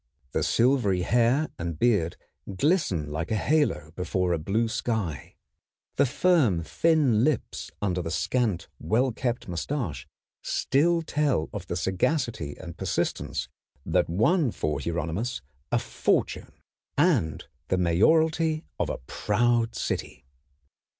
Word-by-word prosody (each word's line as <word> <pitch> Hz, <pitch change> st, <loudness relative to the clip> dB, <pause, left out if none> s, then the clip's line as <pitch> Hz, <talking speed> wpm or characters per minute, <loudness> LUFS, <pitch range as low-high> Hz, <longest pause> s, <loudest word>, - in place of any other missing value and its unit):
The -, -, 0 dB
silvery 115 Hz, -8 st, +2 dB
hair 120 Hz, -, +2 dB
and 85 Hz, -2 st, -3 dB
beard 100 Hz, -7 st, +2 dB, 0.4 s
glisten 120 Hz, -, +1 dB
like 80 Hz, +3 st, -3 dB
a 110 Hz, -, 0 dB
halo 110 Hz, -, +1 dB
before 90 Hz, +1 st, -1 dB
a 85 Hz, -, 0 dB
blue 105 Hz, +9 st, 0 dB
sky. 105 Hz, -, -3 dB, 0.6 s
The 140 Hz, -, +4 dB
firm, 130 Hz, -, +3 dB
thin 140 Hz, -, +2 dB
lips 150 Hz, -1 st, -1 dB
under 90 Hz, -3 st, 0 dB
the 80 Hz, -, -4 dB
scant, 100 Hz, +1 st, 0 dB
well 125 Hz, +4 st, +1 dB
kept 120 Hz, 0 st, -3 dB
mustache 85 Hz, -, -3 dB, 0.3 s
still 165 Hz, +4 st, +1 dB
tell 145 Hz, -, 0 dB
of -, -, -6 dB
the -, -, -3 dB
sagacity 95 Hz, -, -1 dB
and 85 Hz, -, -9 dB
persistence -, -, -2 dB, 0.4 s
that -, -, +1 dB
won 130 Hz, -, +3 dB
for 75 Hz, -7 st, -2 dB
Hieronymus 85 Hz, -, -3 dB, 0.3 s
a -, -, +3 dB
fortune -, -, -1 dB, 0.5 s
and 140 Hz, -, +2 dB, 0.2 s
the 95 Hz, -, +1 dB
mayoralty 155 Hz, -, +3 dB
of -, -, 0 dB
a -, -, -2 dB
proud 115 Hz, -, +1 dB
city. 60 Hz, -, -4 dB
110 Hz, 125 wpm, -27 LUFS, 85-140 Hz, 0.6 s, The